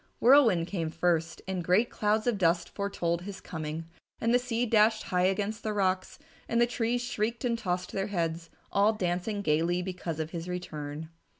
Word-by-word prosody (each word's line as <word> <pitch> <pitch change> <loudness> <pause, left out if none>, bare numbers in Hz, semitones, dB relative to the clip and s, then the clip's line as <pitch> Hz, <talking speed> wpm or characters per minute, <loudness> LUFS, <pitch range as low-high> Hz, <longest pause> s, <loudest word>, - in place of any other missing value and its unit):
Whirlwind 235 -10 +6
came 170 -3 -2
first 165 0 0
and 185 -2 -2
great 190 +8 +3
clouds 215 +1 +1
of 235 -5 +1
dust 170 -1 +2
foretold 175 -4 -2
his 195 +2 -7
coming, 160 0 -5 0.3
and 230 +1 +1
the 245 - +5
sea 245 -1 -1
dashed 215 -1 +4
high 180 -4 +1
against 205 +3 -1
the 215 - -2
rocks, 185 -2 0 0.3
and 235 - +2
the 240 - +6
trees 240 0 -1
shrieked 230 +1 -2
and 235 -1 +2
tossed 180 -5 -2
their 195 +1 -2
heads, 165 -4 -2 0.2
all 205 +2 +4
dancing 195 +1 -2
gaily 170 +2 +1
because 180 -3 -4
of 160 0 -3
his 170 0 -5
return. 155 -3 -5
185 Hz, 180 wpm, -29 LUFS, 170-220 Hz, 0.3 s, Whirlwind